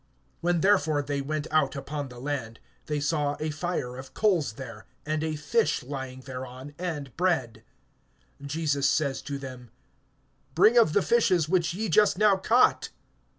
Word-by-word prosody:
(9)When 175 -2 +1
therefore 155 -7 +3
they 140 0 -2
went 150 +2 -3
out 155 -1 +2
upon 145 0 -5
the 125 - -12
land, 125 -5 -4 0.3
they 150 -1 -1
see 145 -1 0
a 155 0 -2
fire 150 -6 -3
of 130 0 -10
coals 180 - +2
there, 115 -3 -9 0.2
and 155 +1 -1
a 160 -1 -1
fish 180 - 0
lying 130 -1 -6
thereon, 130 +1 -8
and 150 -8 -4
bread. 165 -10 0 0.8
(10)Jesus 145 -1 -1
says 140 -2 +1
to 140 -1 -5
them: 130 -3 -9 0.9
Bring 210 +7 +6
of 225 -10 +5
the 205 - +3
fishes 185 -9 +3
which 170 -1 +1
ye 220 +3 -2
just 210 +2 +4
now 210 -1 +5
caught. 230 +6 +3
150 Hz, 155 wpm, -27 LUFS, 135-175 Hz, 0.9 s, Bring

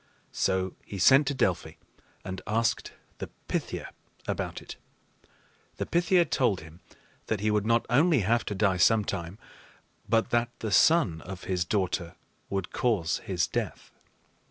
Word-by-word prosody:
So 95 -1 0
he 100 - -8
sent 135 +9 +6
to 140 - 0
Delphi 95 -8 0 0.5
and 95 0 -5
asked 115 +1 0 0.3
the - - -4 0.2
Pythia - - -3 0.4
about - - -3
it. - - -10 1.0
The - - -2
Pythia 175 +1 +3
told 125 - +1
him 80 +2 -14 0.5
that 110 -3 -1
he 105 0 +1
would 105 0 +1
not 115 0 +3
only 145 +2 +4
have 115 +5 +2
to 105 - -3
die 95 -2 +2
some 105 +4 +4
time, 90 0 -4 0.7
but 115 +2 +2
that 120 0 +2
the 110 - -4
son 100 - +4
of 95 0 -8
his 90 -2 -1
daughter 90 -3 -1 0.3
would 95 -2 -3
cause 105 -9 0
his 90 -4 -1
death. - - -4
105 Hz, 150 wpm, -28 LUFS, 95-120 Hz, 1.0 s, sent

